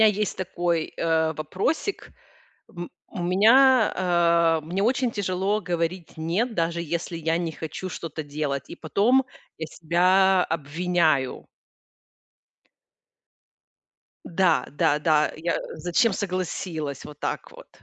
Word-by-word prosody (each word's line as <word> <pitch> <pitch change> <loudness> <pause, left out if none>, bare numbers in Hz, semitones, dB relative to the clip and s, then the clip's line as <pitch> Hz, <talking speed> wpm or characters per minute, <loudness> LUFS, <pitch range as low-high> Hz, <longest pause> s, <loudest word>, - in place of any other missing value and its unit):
Меня 220 - +8
есть 210 -1 -2
такой, 175 -3 -2
э, 160 -1 +1
вопросик. 185 - -2 0.7
М 175 0 -6 0.2
у 180 - -7
меня, 225 +7 +5 0.7
э 155 - -13
мне 180 +4 -2
очень 250 +1 +1
тяжело 200 0 -1
говорить 175 -1 -3
"нет", 190 +9 -1
даже 170 0 0
если 170 +1 -4
я 165 0 0
не 170 -2 -2
хочу 160 +4 -6
что-то 160 -3 -6
делать. 145 -2 -3
И - - -7
потом 235 +11 +2 0.3
я 160 - -4
себя 180 +4 +3
обвиняю. 160 -2 0 2.8
Да, 170 -6 +2
да, 145 +1 +1
да. 150 -1 +2
Я 165 +2 -1 0.2
зачем 175 +7 +1
согласилась? 180 -6 -4
Вот 150 -1 -11
так - - -4
вот. - - -14
170 Hz, 120 wpm, -25 LUFS, 160-190 Hz, 2.8 s, Меня